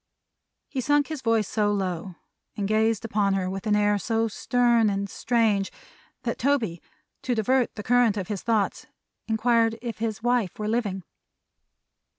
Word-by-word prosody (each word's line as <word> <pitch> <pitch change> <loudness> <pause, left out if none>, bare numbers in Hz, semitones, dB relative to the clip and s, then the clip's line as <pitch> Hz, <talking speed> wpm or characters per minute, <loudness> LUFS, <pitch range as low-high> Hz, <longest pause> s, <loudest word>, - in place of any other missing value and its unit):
He 265 - -3
sunk 290 +3 +2
his 310 -4 -5
voice 225 -4 +1
so 210 -1 +1
low, 185 -2 -3 0.4
and 200 -1 -1
gazed 220 +1 +1
upon 200 -3 +1
her 185 -1 -1
with 195 +3 -4
an 210 - +3
air 205 0 +2
so 225 +1 0
stern 235 0 +2
and 200 0 -2
strange, 220 -3 +1 0.5
that 235 - -3
Toby, 235 - 0 0.4
to 250 -1 -1
divert 250 +3 +1
the 210 - -6
current 240 -2 +3
of 190 -3 -3
his 205 -3 -4
thoughts, 220 -4 0 0.4
inquired 225 0 +2
if 235 -2 -6
his 220 -1 -3
wife 240 -6 +1
were 210 - -3
living. 210 -5 -1
220 Hz, 160 wpm, -25 LUFS, 200-235 Hz, 0.5 s, an